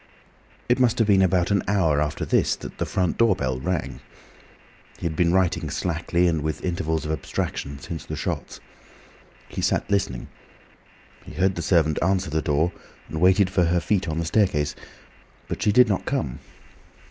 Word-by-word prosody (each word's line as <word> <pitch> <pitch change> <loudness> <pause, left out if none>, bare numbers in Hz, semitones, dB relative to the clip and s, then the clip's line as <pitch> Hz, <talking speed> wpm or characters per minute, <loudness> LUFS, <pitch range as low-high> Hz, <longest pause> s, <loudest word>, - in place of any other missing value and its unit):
It 125 +2 +2
must 125 -1 +3
have 115 - +2
been 100 -2 +5
about 90 0 +2
an 100 - +3
hour 85 -8 +2
after 75 -1 -2
this - - +2
that - - -10
the - - -1
front 90 -3 -1
door 115 -4 +4
bell 65 -5 -2
rang. 90 +4 -3 1.0
He - - -7
had 80 -2 -1
been 85 +1 +2
writing 90 -2 +1
slackly, 85 +1 0
and 80 -3 +1
with 80 +4 -3
intervals 80 -3 -1
of 75 - -2
abstraction, 70 -1 -3
since 80 +1 -7
the - - -5
shots. - - -4 0.9
He - - -5
sat - - 0
listening. 100 -12 -1 0.9
He - - -11
heard 95 +1 +1
the 85 - -4
servant 80 -3 +2
answer 95 -2 +1
the 80 0 0
door, 80 +3 +1 0.4
and 80 +2 -4
waited 95 +1 +4
for 90 -3 +2
her 85 +1 +2
feet 90 +3 0
on 80 -1 -2
the 85 - -1
staircase, 80 -5 +1 0.7
but - - -5
she 105 - +3
did 125 +3 +6
not 100 -3 -1
come. - - -2
85 Hz, 180 wpm, -24 LUFS, 80-95 Hz, 1.0 s, did